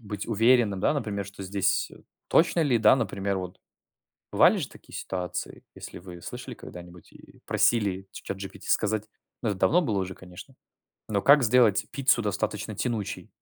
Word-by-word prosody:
быть 105 -3 -6
уверенным, 115 -3 +3
да, 150 - +2
например, 100 -8 -3
что 100 0 -10
здесь 100 +1 0 0.4
точно 170 +1 +3
ли, 130 -7 +3
да, 110 +3 +6
например 100 -5 -2
вот, 90 0 -6 0.7
бывали - - +5
же - - -3
такие - - -14
ситуации, 90 -2 -5
если - - -9
вы 85 -1 -11
слышали - - -7
когда-нибудь 90 -1 -12
и - - -17
просили 100 -5 +1
ч - - -10
чат 100 - -5
GPT 95 0 -9
сказать- 110 0 0 0.4
ну, 110 - +1
это 100 -2 -3
давно 175 +3 +4
было 105 -9 0
уже, 95 0 -4
конечно, 95 +8 -13 0.5
но- 100 -2 0
как 140 -1 +7
сделать 110 -3 +4
пиццу 135 -4 +2
достаточно 105 +1 -3
тянучей. 110 -1 -3
105 Hz, 165 wpm, -27 LUFS, 95-115 Hz, 0.7 s, как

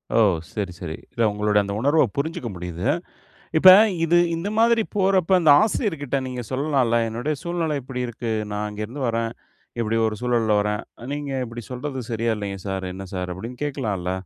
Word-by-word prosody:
ஓ! - - +5 0.4
சரி 100 -4 -2
சரி. 80 -3 -5 0.2
இல்ல 115 - -3
உங்களோட 105 0 +1
அந்த 100 0 -4
உணர்வ 145 +5 +4
புரிஞ்சுக்க 140 -5 -2
முடியிது. 90 -1 -5 0.7
இப்ப 185 +3 +10 0.3
இது 175 +1 +4 0.2
இந்த 180 +5 -3
மாதிரி 230 0 +4
போறப்ப, 190 -2 +2
ஆந்த 160 - +5
ஆசிரியர்க்கிட்ட 160 - 0
நீங்க 125 -1 -4
சொல்லலாலம்ல? 130 -4 +1
"என்னுடைய 120 +7 -2
சூழ்நிலை 170 -3 -1
இப்டி 125 -1 -4
இருக்கு. 120 0 -5 0.2
நான் 105 +1 -2
அங்கேருந்து 105 +7 -6
வரேன். 115 0 -1 0.5
இப்டி 115 0 0
ஒரு 105 - -4
சூழல்ல 115 -3 +2
வரேன். 105 0 -1 0.3
நீங்க 145 -1 -4 0.2
இப்டி 115 -1 -8
சொல்றது 130 0 -4
சரியா 115 0 0
இல்லைங்க 100 -2 -5
சார், 95 -1 -3
என்ன 95 +1 -7
சார்?" 90 -1 -3
அப்டின்னு 120 +8 -7
கேக்கலாம்ல்ல. 105 -11 -2
120 Hz, 165 wpm, -23 LUFS, 105-145 Hz, 0.7 s, இப்ப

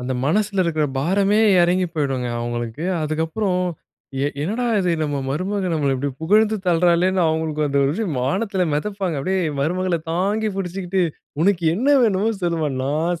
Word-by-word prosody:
அந்த 125 +1 -3
மனசுல 200 +4 +1
இருக்கிற 155 -2 0
பாரமே 195 +7 +2 0.2
இறங்கி 180 +1 +2
போய்டுங்க 135 -5 -1
அவங்களுக்கு. 120 +5 -4 0.2
அதுக்கப்பறம், 165 +5 -1 0.6
எ - - +2
என்னடா 225 +9 -1
இது 180 -2 +1
நம்ம 145 -2 -1
மருமகள் 185 +3 -1
நம்மள 140 -3 +1
இப்படி 140 +2 -2
புகழ்ந்து 215 +5 +3
தள்ளுறாளேன்னு, 180 +2 +3
அவங்களுக்கு 155 -1 -1
அந்த 140 0 0
ஒரு 140 - +1
இது 225 - -1 0.2
வானத்தில 190 - 0
மெதப்பாங்க. 190 0 -2
அப்படியே 190 +5 0 0.2
மருமகளை 180 +3 0
தாங்கி 205 +5 0
புடிச்சுக்கிட்டு, 185 0 -2 0.4
"உனக்கு 180 -2 +2
என்ன 255 +9 0
வேணுமோ 215 0 +2
சொல்லும்மா. 165 -4 0
நான் 160 +4 -1
175 Hz, 145 wpm, -21 LUFS, 150-195 Hz, 0.6 s, புகழ்ந்து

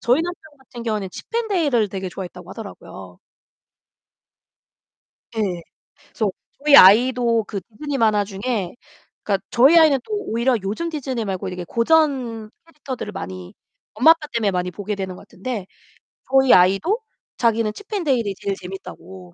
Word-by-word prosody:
저희 250 +7 +2
남편 355 +1 -5 0.2
같은 250 -3 -11
경우에는 215 -4 -2
칩앤데일을 335 - 0
되게 190 -1 -5
좋아했다고 180 -1 -9
하더라고요. 95 - -10 2.1
네. 190 -6 -2 0.5
그래서 215 -4 -1 0.3
저희 295 -2 +7
아이도 230 +3 +6
그 200 - -4
디즈니 275 +5 -6
만화 215 -3 +3
중에 200 -1 -3 0.5
그니까 195 -2 0
저희 275 +8 +6
아이는 305 -5 +6
또 430 - -6
오히려 250 - 0
요즘 220 +13 -3
디즈니 265 -7 -3
말고 190 -2 -3
이렇게 180 -1 -5
고전 240 - +1 0.2
캐릭터들을 275 -9 -7
많이 95 - -7 0.4
엄마, 255 +10 +6
아빠 320 -2 0
때문에 215 -4 +1
많이 180 0 -1
보게 205 +3 -4
되는 190 -2 -5
것 - - -13
같은데 205 0 -6 0.7
저희 265 -1 +5
아이도 195 - +4 0.4
자기는 230 -2 +1
칩앤데일이 280 - -1
제일 200 -1 -2
재밌다고. 190 0 -10
225 Hz, 345 characters per minute, -21 LUFS, 195-270 Hz, 2.1 s, 저희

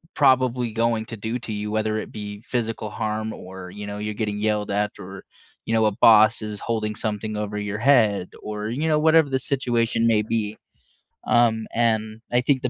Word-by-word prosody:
probably 130 -4 +3
going 115 -1 0
to 115 - -7
do 110 +4 -3
to 115 -2 -6
you, 105 0 -4
whether 110 0 0
it - - -7
be 105 -1 -7
physical 115 -3 -3
harm 110 +1 -3
or, 95 0 -9
you 105 0 -7
know, 100 0 -5
you're 105 0 -3
getting 105 -1 -2
yelled 105 -1 0
at 105 +1 0
or, 95 +1 -9 0.4
you 115 - -2
know, 110 -1 +3
a 105 - +3
boss 110 0 +7
is 105 -1 -5
holding 110 -2 -2
something 105 0 -3
over 105 0 -3
your 105 0 -3
head 110 -7 +3
or, 105 0 -4
you 145 +7 -1
know, 150 -1 +3
whatever 160 -1 +4
the 135 -1 0
situation 120 -4 0
may 110 -2 +3
be. 110 -1 -2 0.7
Um, 115 -2 +2
and 110 -1 0
I 120 - +3
think 130 0 +1
the 125 - 0
110 Hz, 200 wpm, -23 LUFS, 105-120 Hz, 0.7 s, boss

